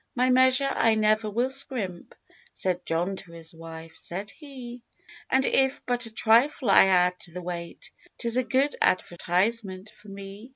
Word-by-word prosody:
"My 255 +1 +2
measure 260 +2 +4
I 225 -4 +3
never 215 0 +2
will 240 +5 0
scrimp," 245 -10 -4 0.4
Said 180 -1 -2
John 175 +4 -1
to 170 -3 -10
his 165 0 -9
wife, 165 0 -10
said 195 +4 -6
he— 255 -5 -10 0.5
"And 265 +1 +2
if 265 0 +1
but 245 -1 -1
a - - -11
trifle 230 +2 +3
I - - +8
add 180 -1 +3
to 175 - -10
the 180 +2 -7
weight 170 -1 -7 0.3
'Tis 235 -1 -2
a 255 - +2
good 270 +3 +1
advertisement 185 +3 0
for 210 - -20
me." 200 +3 -10
215 Hz, 165 wpm, -26 LUFS, 180-250 Hz, 0.5 s, I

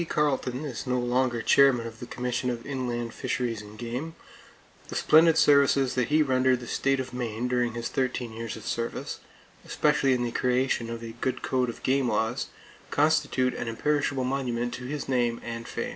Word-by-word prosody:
Carleton 140 -2 0
is 130 -2 -5
no 125 0 +1
longer 120 -1 0
chairman 135 -4 +5
of 115 -1 -8
the 120 - -7
Commission 125 +1 -2
of 120 -1 -4
Inland 120 -4 -3
Fisheries 115 -4 -2
and 105 0 -12
Game, 125 +8 -5 0.7
the - - -7
splendid 160 +1 +5
services 140 -3 +4
that 125 -2 0
he 155 +1 +4
rendered 130 -2 +2
the 120 - -8
state 135 +3 0
of 130 -1 -5
Maine 120 -1 -2
during 125 -2 0
his 120 0 -3
thirteen 125 -3 -2
years 115 0 -5
of - - -10
service, 115 0 -3 0.4
especially 145 -3 +2
in 125 -1 0
the 120 - -2
creation 125 -1 0
of 115 0 -6
a 115 - -6
good 130 - -1
code 125 -1 +1
of 115 - -8
game 135 -1 +2
laws, 115 +4 0 0.4
constitute 145 -4 +2
an - - -4
imperishable 140 +3 0
monument 125 -2 -1
to 125 - -6
his 145 +2 -4
name 120 -3 +1
and 115 0 -6
fame. - - -3
125 Hz, 185 wpm, -27 LUFS, 120-135 Hz, 0.7 s, chairman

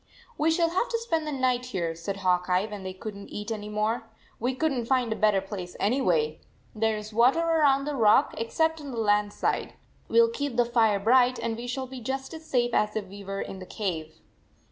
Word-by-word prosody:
" 485 - -27
We 310 - +3
shall 330 0 +2
have 375 +7 0
to 460 - 0
spend 330 -10 -2
the - - -2
night 255 -2 0
here," 175 -9 -2
said 170 +4 -5
Hawk 180 -1 +1
Eye, 180 +2 +2
when 210 -2 -7
they 190 0 -5
could 200 +3 -7
n 200 0 -10
t - - -19
eat 210 +2 -5
any 210 -1 -4
more. 220 +2 -1
" - - -32
We 250 +3 -1
couldn 280 -2 0
t 235 - -3
find 250 -3 +2
a - - -6
better 210 -3 +3
place 190 -2 -7
anyway. 175 - +1 0.3
There 220 0 0
is 210 +1 -8
water 245 +8 +4
around 305 -5 +3
the 295 - -2
rock 215 -5 +4
except 320 +7 0
on 285 - -7
the 245 - -6
land 205 -2 +2
side. - - -2 0.3
We - - +3
ll 460 0 +6
keep 285 - -3
the 240 - +4
fire 225 -4 +3
bright, 250 +4 +4
and 225 - -2
we 240 +2 -6
shall 260 +2 -3
be 255 -1 -9
just 265 +4 -4
as 320 0 -10
safe 240 -3 +1
as 210 0 +1
if 215 -2 -2
we 200 +1 -10
were 195 0 -4
in 190 - -6
the 185 - -9
cave." 165 -7 -4
230 Hz, 245 wpm, -27 LUFS, 205-270 Hz, 0.3 s, ll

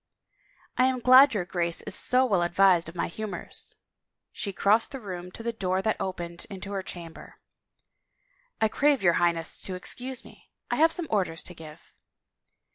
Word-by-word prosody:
" - - -34
I 255 - +6
am 260 -1 +1
glad 255 +1 +7
your 185 -4 -1
Grace 170 -1 -2
is - - -5
so 255 +1 +4
well 200 -8 +2
advised 175 -1 +3
of 170 - -13
my - - -1
humors." 215 +4 -7 0.6
She 200 - -4
crossed 205 +4 +2
the 270 - -7
room 180 -5 -7
to 230 - -8
the 235 0 -2
door 190 -3 -1
that 220 - -1
opened 170 -2 -5
into 195 0 -7
her 195 -1 -2
chamber. 170 -3 -10 0.6
" - - -42
I 220 - +3
crave 275 +2 +2
your 175 -2 +5
Highness 170 -1 0
to 185 - -4
excuse 250 +7 -3
me - - -17
— - - -15
I - - 0
have 320 +1 +5
some 345 0 -3
orders 180 -6 0
to 180 - -7
give." 155 -2 -13
195 Hz, 190 wpm, -27 LUFS, 175-250 Hz, 0.6 s, glad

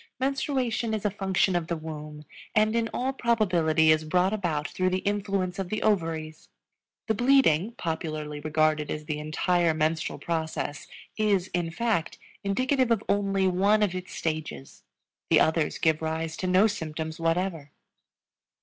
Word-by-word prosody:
Menstruation 260 -4 0
is 215 - -5
a 205 - +2
function 190 -1 +1
of 170 -2 -1
the 170 - -2
womb 150 -1 -8 0.3
and 215 +1 +3
in 230 -1 +1
all 260 +2 -1
probability 175 - +3
is 155 0 +3
brought 180 +5 +1
about 165 -8 -1
through 185 0 0
the 185 - 0
influence 200 -3 -1
of 190 -2 -3
the 215 - -2
ovaries. 165 -6 -1 0.6
The 220 - +1
bleeding, 235 - +3
popularly 155 -5 -4
regarded 155 0 +1
as 150 0 -4
the 150 -1 -3
entire 165 +2 +1
menstrual 160 +1 -1
process, 160 -3 -3 0.3
is, 200 -4 +1
in 175 -1 -1
fact, 170 -1 -1 0.3
indicative 255 +6 +1
of 225 -3 +1
only 195 -1 +1
one 200 +4 +3
of 195 -4 +1
its 185 0 -6
stages; 155 -4 -4 0.5
the - - +6
others 160 -1 +1
give 160 -1 +1
rise 160 0 -2
to 185 - -2
no 185 +3 +5
symptoms 160 -5 -3
whatever. 165 -2 -1
180 Hz, 150 wpm, -27 LUFS, 160-210 Hz, 0.6 s, the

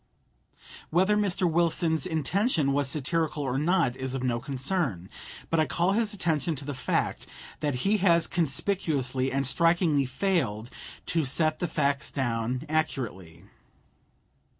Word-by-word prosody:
Whether 190 +5 +3
Mr. 200 -3 +1
Wilson's 165 0 +1
intention 160 - +1
was 140 -1 +1
satirical 155 +1 -1
or 135 -1 -1
not 150 -5 +2
is 130 0 -4
of 130 - -3
no 120 -2 0
concern; 135 - -2 0.4
but 165 - +2
I 155 - +3
call 175 +2 +1
his 215 +1 +1
attention 165 - -1
to 140 - -7
the 145 - -4
fact 130 - -1 0.3
that 145 -3 -1
he 210 +2 +3
has 170 -4 +4
conspicuously 140 -5 0
and 135 +1 0
strikingly 165 0 +2
failed 130 - -1 0.3
"to 165 -1 0
set 155 +3 +2
the 175 - -1
facts 140 -3 0
down 125 0 -2
accurately." 105 - -3
150 Hz, 135 wpm, -27 LUFS, 130-175 Hz, 0.4 s, has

